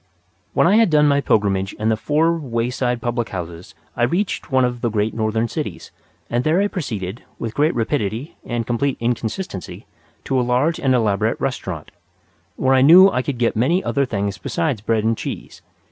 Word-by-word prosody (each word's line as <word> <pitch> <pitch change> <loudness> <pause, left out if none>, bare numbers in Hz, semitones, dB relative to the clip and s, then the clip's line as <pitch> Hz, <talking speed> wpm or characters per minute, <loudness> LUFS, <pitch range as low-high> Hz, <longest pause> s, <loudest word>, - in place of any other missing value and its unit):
When - - +3
I 195 +5 +5
had 225 -4 +5
done 150 -1 +4
my 140 0 +3
pilgrimage 100 -5 +1
in 110 +1 -1
the 110 - +3
four 155 +8 +1
wayside 125 -3 -2
public 120 -1 -1
houses 85 -3 -7 0.2
I - - -4
reached 175 +8 -1
one 130 -1 +4
of 120 -1 -3
the 120 - 0
great 110 0 -1
northern 110 +1 0
cities, - - -5 0.4
and 120 +1 -1
there 155 +5 +2
I 200 - +2
proceeded, 110 - -5
with 115 -1 -5
great 150 +5 +1
rapidity 115 +2 -2
and 120 -1 -3
complete 125 +4 -1
inconsistency, 115 - -4 0.4
to 130 - 0
a - - +3
large 125 +7 +1
and 130 -2 +2
elaborate 105 -5 +1
restaurant, - - -4 0.6
where 130 0 +2
I 130 - +5
knew 180 +8 +8
I 125 - 0
could 130 -1 -4
get 120 -1 +1
many 150 - +2
other 140 -1 0
things 100 -4 -2
besides 150 - -2
bread 110 0 0
and 115 +1 +2
cheese. - - -7
120 Hz, 185 wpm, -20 LUFS, 110-145 Hz, 0.6 s, knew